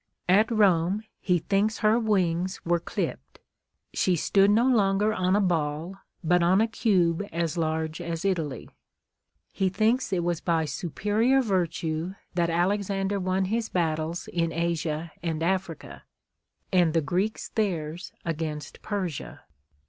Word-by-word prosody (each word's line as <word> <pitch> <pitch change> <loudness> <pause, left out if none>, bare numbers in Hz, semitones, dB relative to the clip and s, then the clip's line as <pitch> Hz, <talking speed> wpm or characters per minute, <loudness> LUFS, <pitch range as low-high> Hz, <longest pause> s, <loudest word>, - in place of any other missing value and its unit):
At 205 +5 +4
Rome 200 -2 +3 0.2
he 180 -3 +2
thinks 200 +6 0
her 220 +2 +3
wings 185 -4 0
were 170 0 +2
clipped: 65 - -4 0.6
she 185 - +2
stood 195 +4 +3
no 225 +4 +4
longer 210 -3 +3
on 185 -1 +1
a - - +3
ball, 165 -1 -1 0.3
but 175 +2 +3
on 180 +3 +4
a 225 - +3
cube 190 -6 +1
as 165 -2 -1
large 160 0 -2
as 170 +1 -4
Italy. 160 - -1 0.8
He 190 -1 0
thinks 220 +6 +1
it 180 -3 0
was 170 -2 -1
by 165 -2 +1
superior 205 - +1
virtue 175 -3 -1 0.2
that 170 -1 +1
Alexander 195 +3 0
won 185 +1 0
his 225 +3 -1
battles 160 -1 -1
in 165 -1 0
Asia 165 -1 -2
and 165 -2 -2
Africa, 180 -2 -3 0.7
and 175 -3 +3
the 165 - +4
Greeks 185 +9 -2
theirs 175 -5 -2
against 155 -3 -4
Persia. 185 -8 -4
180 Hz, 135 wpm, -26 LUFS, 165-200 Hz, 0.8 s, At